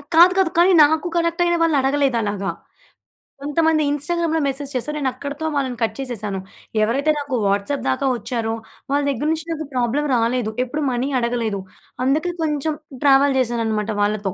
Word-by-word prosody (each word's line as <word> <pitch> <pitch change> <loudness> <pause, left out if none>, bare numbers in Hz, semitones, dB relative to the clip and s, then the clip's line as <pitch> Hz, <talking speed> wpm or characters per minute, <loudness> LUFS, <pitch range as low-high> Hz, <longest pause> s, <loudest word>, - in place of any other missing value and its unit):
కాదు, 345 +3 +8
కాదు. 375 -3 +3
కానీ 360 +2 +6
నాకు 315 +4 +1
కనెక్ట్ 335 0 0
అయిన 345 0 +2
వాళ్ళు 325 -3 +3
అడగలేదు 270 -2 +1
అలాగా. 200 -1 -2 0.9
కొంతమంది 310 +2 +2
ఇన్‌స్టాగ్రామ్‌లో 325 +2 0
మెసేజ్ 275 +1 -4
చేసారు. 300 +5 -2
నేను 265 -2 +1
అక్కడితో 285 +4 -6
వాళ్ళని 260 -3 -1
కట్ 220 -1 -1
చేసేసాను. 215 -7 -4 0.4
ఎవరైతే 275 +8 +2
నాకు 280 -3 -3
వాట్సాప్ 200 +8 0
దాకా 130 - 0
వచ్చారో, 230 -2 -3 0.4
వాళ్ళ 285 - +2
దగ్గర 275 +2 -1
నుంచి 320 0 -2
నాకు 315 -1 -3
ప్రాబ్లమ్ 255 +4 0
రాలేదు. 235 -1 0
ఎప్పుడు 295 +5 -3
మనీ 250 +3 -1
అడగలేదు. 235 -4 -1 0.5
అందుకే 310 +6 +1
కొంచెం 300 0 -1 0.3
ట్రావెల్ 275 0 +5
చేశాననమాట 225 -3 -1
వాళ్ళతో. 205 -2 0
275 Hz, 155 wpm, -21 LUFS, 230-305 Hz, 0.9 s, కాదు